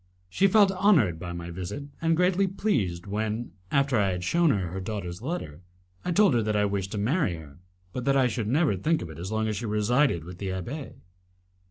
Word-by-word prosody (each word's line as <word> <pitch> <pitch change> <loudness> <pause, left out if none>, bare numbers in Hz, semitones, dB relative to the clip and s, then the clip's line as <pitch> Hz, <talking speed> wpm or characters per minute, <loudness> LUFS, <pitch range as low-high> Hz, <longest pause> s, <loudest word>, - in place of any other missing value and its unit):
She 195 - +3
felt 200 0 +5
honoured 180 - +3
by 90 0 -5
my 85 0 -6
visit, 95 +11 -5 0.2
and 165 -1 +2
greatly 185 +2 +3
pleased 115 - -1
when, 110 +3 -3 0.2
after 140 -2 +2
I 100 -1 +2
had 90 0 -4
shewn 170 - +3
her 95 - 0
her 95 +3 -5
daughter's 95 -3 -5
letter, 120 - -5 0.4
I 180 - -1
told 200 -3 +5
her 120 - +3
that 105 -1 -1
I 105 0 +3
wished 100 0 -2
to - - -2
marry 115 - +1
her, 75 -1 -12 0.3
but 125 - -4
that 135 0 +3
I 130 - +4
should 115 -3 -1
never 140 - +2
think 155 - 0
of 80 - -8
it 80 - -10
as 95 +4 -5
long 110 0 0
as 105 -1 -2
she 115 +2 -4
resided 105 - +2
with 90 +2 -10
the 100 - -4
abbé. 115 - -5
110 Hz, 220 wpm, -27 LUFS, 95-150 Hz, 0.4 s, felt